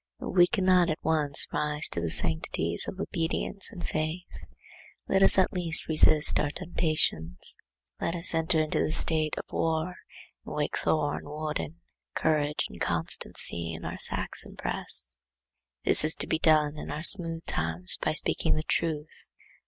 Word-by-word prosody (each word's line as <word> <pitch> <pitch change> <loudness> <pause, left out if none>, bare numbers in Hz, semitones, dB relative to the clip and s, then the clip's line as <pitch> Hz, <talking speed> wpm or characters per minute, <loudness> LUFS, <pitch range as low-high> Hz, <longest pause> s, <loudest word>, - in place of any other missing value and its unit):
If - - -6
we 175 -1 +6
cannot 185 -3 +2
at 155 - -2
once 150 -3 +2
rise 150 0 0
to 85 - -5
the 85 - -3
sanctities 80 +1 -1
of 190 - -7
obedience 185 +3 -1
and 180 -6 -7
faith, 155 +3 -3 0.8
let 195 - +1
us 195 - +5
at 190 +2 +2
least 170 -3 -1
resist 155 -1 +4
our 145 - -1
temptations; 150 - -2 0.4
let 165 - -2
us 170 +1 +4
enter 165 0 +1
into 155 - -2
the 155 - -1
state 155 -2 +2
of - - -4
war 160 +1 -1 0.5
and - - -9
wake 150 -1 -2
Thor 145 -2 -1
and - - -14
Woden, 155 +2 -6 0.3
courage 150 -2 0
and - - -14
constancy, 85 0 +1
in 80 - -9
our - - -6
Saxon - - +3
breasts. - - -1 0.7
This - - +8
is 155 +1 +1
to - - -3
be 160 - -2
done 155 -2 +2
in - - -8
our 150 - -5
smooth 165 -3 +1
times 80 +3 -3
by - - -1
speaking - - +1
the 155 - -3
truth. 155 -2 -4
155 Hz, 160 wpm, -27 LUFS, 150-170 Hz, 0.8 s, This